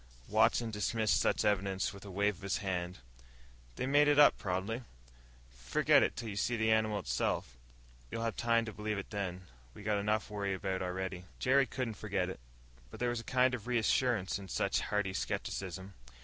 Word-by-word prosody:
Watson 110 +2 +3
dismissed 110 +1 +1
such - - +1
evidence 100 -1 +1
with 100 - -11
a - - -8
wave 100 0 0
of - - -17
his 100 0 -1
hand. 90 -2 -3 0.8
"They - - -2
made 145 +2 +4
it 145 -1 +4
up, 145 - +8
probably. 95 +6 -2 0.7
Forget - - +3
it - - +1
till 115 -2 -5
you 100 - -5
see 120 +3 0
the 110 0 +2
animal 110 -1 +2
itself. - - -1 0.5
You'll 115 - -3
have 115 -1 -1
time 115 -1 +2
to 110 - -6
believe 105 0 -3
it 100 - -6
then. 95 -3 -3 0.3
We - - -10
got 105 -1 +1
enough 105 +1 0
to 105 - -12
worry 100 -2 -1
about 95 0 -2
already." 90 0 -3
Jerry 135 +1 +3
couldn't 125 -2 -3
forget 100 -3 -2
it. - - -7 0.5
But - - -11
there 125 - +1
was 120 -1 -1
a - - -7
kind 130 +1 +2
of 120 -1 -5
reassurance 115 -4 +1
in 100 - -9
such - - 0
hearty 105 -2 -1
skepticism. 95 +1 -4
105 Hz, 190 wpm, -33 LUFS, 95-115 Hz, 0.8 s, up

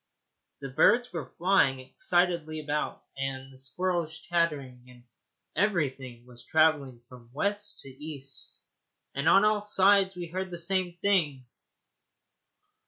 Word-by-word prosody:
The 135 - -5
birds 235 - +3
were 160 -6 -5
flying 170 -7 +2
excitedly 170 +3 0
about, 150 0 -3
and 135 0 -4
the - - -16
squirrels 170 +3 -2
chattering, 150 -8 -1
and 125 -1 -16 0.5
everything 135 - -1
was 120 -1 -14
travelling 145 -5 +2
from 120 -2 -15
west 205 +6 -2
to 135 - -11
east, 140 -3 -8 0.5
and 140 - +1
on 195 +2 +6
all 210 -1 +2
sides 195 -1 +4
we 175 -1 -5
heard 185 +3 -4
the 175 - -6
same 175 0 -1
thing. 150 -10 +2
160 Hz, 125 wpm, -28 LUFS, 135-185 Hz, 0.5 s, on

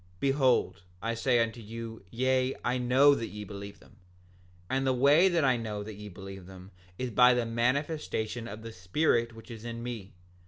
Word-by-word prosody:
Behold, 135 -9 +2 0.2
I 115 +3 -2
say 120 +1 +2
unto 115 +1 -5
you, 115 0 -8
yea, 130 +3 +1
I 125 +1 +1
know 130 +4 +5
that 115 -5 -2
ye 105 0 -7
believe 100 0 -8
them; - - -20 0.7
and 135 +3 0
the 130 - +3
way 145 +8 +6
that 170 -5 +2
I 130 -2 +3
know 105 -3 -4
that 110 +1 -7
ye 105 +1 -9
believe 95 0 -10
them 95 0 -12 0.3
is 125 -1 -3
by 125 +2 +6
the 120 -1 0
manifestation 120 -2 -1
of 110 +2 -8
the 115 - -7
Spirit 115 - +1
which 115 +2 -12
is 115 -1 -9
in 115 0 -6
me. 115 -7 -6
115 Hz, 190 wpm, -29 LUFS, 105-130 Hz, 0.7 s, way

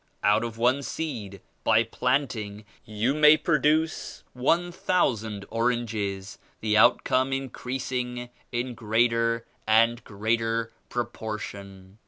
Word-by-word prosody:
Out 105 +3 +4
of 115 -1 -5
one 125 +4 +2
seed, 115 - -5 0.2
by 110 0 +4
planting, 115 -4 -2 0.2
you 110 +5 0
may 150 +1 +7
produce 155 0 0
one 165 +8 +1
thousand 110 - 0
oranges; 110 -5 -2 0.2
the 105 -1 0
outcome 130 +4 +4
increasing 125 -2 -3 0.2
in 120 +1 -2
greater 115 0 +1 0.2
and 115 +2 +4
greater 115 +2 -1 0.2
proportion. 105 -4 -6
115 Hz, 100 wpm, -26 LUFS, 110-130 Hz, 0.2 s, may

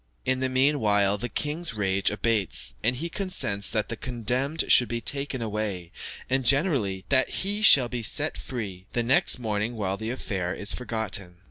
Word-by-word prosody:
In 130 0 +1
the 130 0 0
meanwhile, 110 -7 +2
the 120 - -4
king's 155 -2 -3
rage 95 -2 +1
abates, 105 -2 -1
and 120 +3 +2
he 155 +7 -4
consents 170 - -2
that 105 -2 -1
the 115 - -3
condemned 125 +6 0
should 125 - +6
be 120 - -2
taken 140 +1 0
away, 105 -5 -3 0.4
and 135 0 0
generally, 125 - +1
that 130 -1 +4
he 205 +2 -2
shall 140 - +7
be 120 0 -4
set 145 +7 0
free; 100 -7 -7
the 120 - 0
next 130 +3 +3
morning 110 -1 -2
the 105 - -3
whole 100 +4 -3
affair 95 -8 -3
is 100 - +1
forgotten. 110 -7 -2
115 Hz, 170 wpm, -26 LUFS, 105-135 Hz, 0.4 s, shall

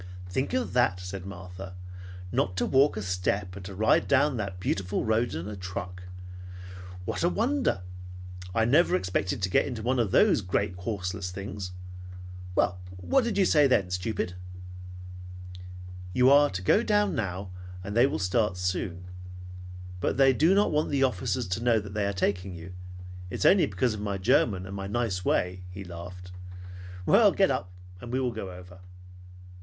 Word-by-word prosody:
"Think 130 +10 -2
of 255 -1 -1
that!" 120 -7 +2
said 90 +1 -7
Martha. 90 0 -9 0.6
"Not 90 0 0
to - - +1
walk 135 -2 +3
a 105 - -3
step, 90 +1 -1
and 100 - -8
to 95 0 -8
ride 110 +3 +3
down 140 0 +3
that 100 -4 -4
beautiful 95 +1 -1
road 110 -2 +1
in 85 +4 -4
a 105 - -6
truck. 90 0 -6 1.0
What - - -3
a 175 - +4
wonder! 240 - 0 0.7
I 110 - +3
never 145 - +4
expected 90 +1 -1
to 95 - +1
get - - +3
into 120 -5 -5
one 125 +2 +1
of 115 -4 +1
those - - +4
great 90 0 -1
horseless 90 -1 -4
things. 95 0 -6 0.8
Well, 90 -1 +1 0.2
what 250 - +2
did 230 -3 -2
you 195 - +4
say 150 -5 +5
then, 100 -8 +2
stupid?" 90 0 -2 1.8
"You 125 +5 +5
are 145 +1 +6
to 95 -1 -5
go 205 - +4
down 210 -3 +2
now, 95 -2 -3 0.3
and 100 +2 -5
they 120 +3 +6
will 145 - -2
start 95 +1 0
soon. 90 -1 -2 0.9
But - - -1
they 135 -1 +6
do 165 +8 +4
not 205 +1 +3
want 150 0 +1
the 140 -2 +1
officers 125 -1 0
to 95 +6 -2
know 120 -2 +4
they 100 0 -3
are - - 0
taking 95 -1 -1
you. 85 +2 -9 0.6
It - - -5
is - - -2
only 190 -1 +6
because 105 +4 0
of 105 - -6
my 100 -1 -2
German 95 0 +2
and 95 +1 -7
my 95 0 -4
nice 105 -4 -1
way," 90 0 0
he 95 +2 -8
laughed. 90 +1 -9 0.7
"Well, 205 - +6
get 195 -4 +3
up, 100 -9 -2 0.3
and 120 +2 -8
we 130 - 0
will 125 -2 0
go 110 -4 -6
over." 90 0 -12
100 Hz, 175 wpm, -28 LUFS, 90-125 Hz, 1.8 s, are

